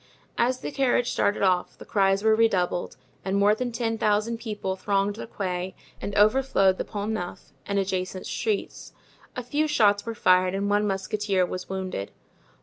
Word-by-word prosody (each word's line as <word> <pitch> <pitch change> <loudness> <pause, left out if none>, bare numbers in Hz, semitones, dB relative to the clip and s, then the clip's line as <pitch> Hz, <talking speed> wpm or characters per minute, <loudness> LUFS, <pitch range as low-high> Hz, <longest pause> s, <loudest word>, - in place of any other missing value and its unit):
As 250 +2 +1
the 145 - -4
carriage 245 -2 +1
started 205 0 +1
off 185 -2 +1
the - - -11
cries 195 0 +2
were 220 0 +5
redoubled 190 -6 +1 0.3
and 195 +1 0
more 205 +1 +5
than 245 +3 -2
ten 225 -1 -2
thousand 215 +2 +1
people 210 -5 -3
thronged 200 +1 0
the 230 - -7
Quai 185 -3 -4 0.3
and 200 - -4
overflowed 210 -3 +3
the - - 0
Pont 210 0 -4
Neuf 180 -5 -6
and 200 - -1
adjacent 185 -1 -2
streets. 430 -3 -3 0.4
A 250 - -4
few 295 +6 0
shots 205 -8 +3
were 230 -1 -5
fired 185 -1 +3
and 200 +1 -1
one 205 0 +2
musketeer 195 -1 0
was 180 +1 -6
wounded. 185 - -4
205 Hz, 170 wpm, -26 LUFS, 190-225 Hz, 0.4 s, were